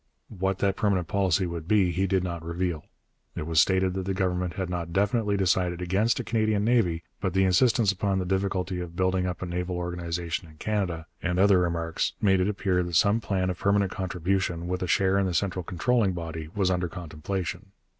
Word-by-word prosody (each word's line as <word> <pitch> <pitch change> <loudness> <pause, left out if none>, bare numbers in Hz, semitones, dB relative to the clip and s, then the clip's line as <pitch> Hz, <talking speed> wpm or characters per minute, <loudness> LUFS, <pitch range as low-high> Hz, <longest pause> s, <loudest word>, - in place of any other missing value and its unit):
What 95 0 0
that 100 -1 +1
permanent 95 -5 +1
policy 95 -1 +1
would 85 -2 -5
be 100 -3 +3
he 95 +3 0
did 95 -1 +1
not 85 -2 -4
reveal. 85 -2 -2 0.5
It - - -4
was 80 -2 +4
stated 95 0 +2
that 95 0 -3
the 95 0 -1
Government 90 -2 -1
had 95 -2 -2
not 85 -2 -4
definitely 105 +2 +1
decided 90 -2 +1
against 95 +8 +1
a - - -2
Canadian 110 -3 +1
navy, 95 -9 +2 0.2
but - - -2
the 95 - +4
insistence 105 +3 +4
upon 100 0 -1
the 95 - -1
difficulty 95 -1 -1
of 85 -1 -6
building 95 0 +1
up 90 +1 -4
a - - -2
naval 90 +1 -3
organization 85 -1 -3
in 80 - -16
Canada, 90 -5 -2 0.2
and 90 -1 -1
other 95 0 +5
remarks, 85 -2 -1
made 95 -2 +3
it 90 +2 +2
appear 95 -3 0
that 85 -1 -3
some 100 +7 +4
plan 95 -4 0
of 90 - -7
permanent 100 -1 +2
contribution, 90 -1 -1
with 90 +1 -2
a 90 - -1
share 95 +3 +3
in 95 - +1
the 90 - -2
central 90 0 0
controlling 95 +4 +1
body, 80 -2 -5
was 95 -3 +2
under 90 -1 0
contemplation. 90 +3 -5
90 Hz, 205 wpm, -27 LUFS, 85-100 Hz, 0.5 s, other